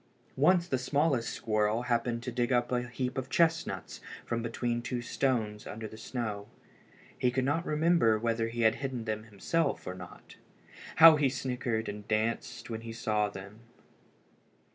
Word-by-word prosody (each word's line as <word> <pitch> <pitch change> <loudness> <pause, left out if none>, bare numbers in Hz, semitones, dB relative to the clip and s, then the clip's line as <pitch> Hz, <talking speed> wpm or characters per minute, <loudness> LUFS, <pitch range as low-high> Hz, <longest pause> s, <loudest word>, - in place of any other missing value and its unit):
Once 170 +5 +4
the 130 -6 0
smallest 140 -2 +1
squirrel 110 +1 0
happened 120 -1 0
to 125 - -4
dig 120 +1 0
up 120 -1 +2
a 125 -1 0
heap 125 +2 -3
of 130 0 -6
chestnuts 160 - 0 0.2
from 115 0 -2
between 120 +1 -2
two 125 +1 -3
stones 115 -4 -1
under 110 +1 -6
the 110 - -11
snow. 110 -3 -4 0.7
He 125 - +3
could 130 +1 0
not 165 +5 0
remember 155 -7 +3
whether 115 0 0
he 120 +1 -4
had 110 0 +4
hidden 130 -4 -3
them 110 0 -3
himself 140 +9 -1
or 90 - -4
not. 90 -1 -12 0.6
How 160 -1 +9
he 145 -2 +3
snickered 125 -3 -2
and 105 0 -7
danced 115 +2 -1
when 115 -1 -5
he 115 0 -7
saw 105 -2 0
them! 100 +2 -10
120 Hz, 165 wpm, -30 LUFS, 110-130 Hz, 0.7 s, How